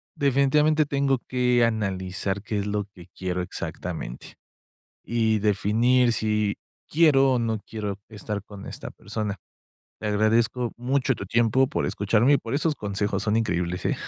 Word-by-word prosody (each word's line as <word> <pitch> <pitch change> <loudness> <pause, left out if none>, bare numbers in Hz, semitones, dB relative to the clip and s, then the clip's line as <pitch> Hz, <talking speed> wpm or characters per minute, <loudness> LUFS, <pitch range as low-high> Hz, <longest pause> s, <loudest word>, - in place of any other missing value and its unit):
definitivamente 150 +2 +3
tengo 140 -2 +1
que 125 -1 +3
analizar 95 -3 -2
qué 105 -2 -2
es 100 - -3
lo 105 -1 -1
que 90 -2 -14
quiero 90 -1 -2
exactamente, 65 -7 -6 0.7
y 110 -2 +1
definir 115 +5 +3
si 105 -2 0 0.3
quiero 135 -4 +5
o 125 - +1
no 110 -2 -1
quiero 105 -3 -4
estar 105 -1 -5
con 100 -2 -11
esta - - -7
persona. 105 -1 -4 0.6
Te 105 - -3
agradezco 115 +3 +1
mucho 130 +2 +1
tu 95 - -6
tiempo 115 +5 +3
por 150 - -1
escucharme, 115 +7 +2
y - - +5
por 115 +3 -4
esos 155 +1 +1
consejos 100 -2 -2
son 110 +1 +1
increíbles 90 -5 -1
eh. - - +1
110 Hz, 150 wpm, -25 LUFS, 100-125 Hz, 0.7 s, quiero